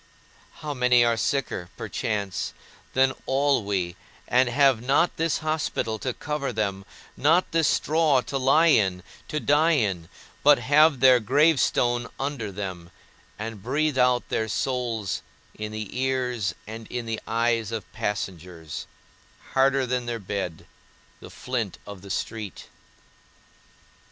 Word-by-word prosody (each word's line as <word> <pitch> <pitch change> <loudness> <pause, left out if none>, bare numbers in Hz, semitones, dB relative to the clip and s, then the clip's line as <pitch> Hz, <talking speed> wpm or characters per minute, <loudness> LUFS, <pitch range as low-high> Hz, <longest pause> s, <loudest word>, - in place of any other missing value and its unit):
How 150 -1 -3
many 125 -2 +4
are 115 0 +2
sicker 115 - -2
(perchance) 100 -4 -3 0.4
than 130 0 +3
all 140 -2 +2
we, 95 -4 -2 0.3
and 125 0 +3
have 135 -2 +3
not 140 +7 +2
this 165 -1 +1
hospital 150 -8 -1
to 130 - -2
cover 145 +2 -3
them, 100 -3 -2 0.3
not 165 +6 +3
this 165 -1 +2
straw 155 -4 +3
to 135 +2 -3
lie 155 +5 +5
in, 95 -3 +2 0.2
to 155 - -2
die 155 +3 +3
in, 95 - 0 0.3
but 145 0 +7
have 145 +2 +4
their 130 -2 +7
gravestone 125 -2 +2
under 135 -7 -3
them, 95 -3 -6 0.5
and 110 -1 -6
breathe 140 +4 0
out 125 -1 +3
their 110 - -1
souls 115 -3 -2 0.3
in 105 0 -6
the 110 -1 -6
ears 125 -5 -1
and 110 +1 -8
in 120 -1 -4
the 115 -1 -3
eyes 115 -1 0
of 110 -3 -6
passengers, 90 -7 -5 0.7
harder 135 0 +3
than 125 -1 -2
their 120 -1 -2
bed, 95 -5 -5 0.5
the - - -11
flint 120 -7 -4
of 100 -2 -9
the 100 - -11
street? 105 0 -4
120 Hz, 135 wpm, -25 LUFS, 105-135 Hz, 0.7 s, but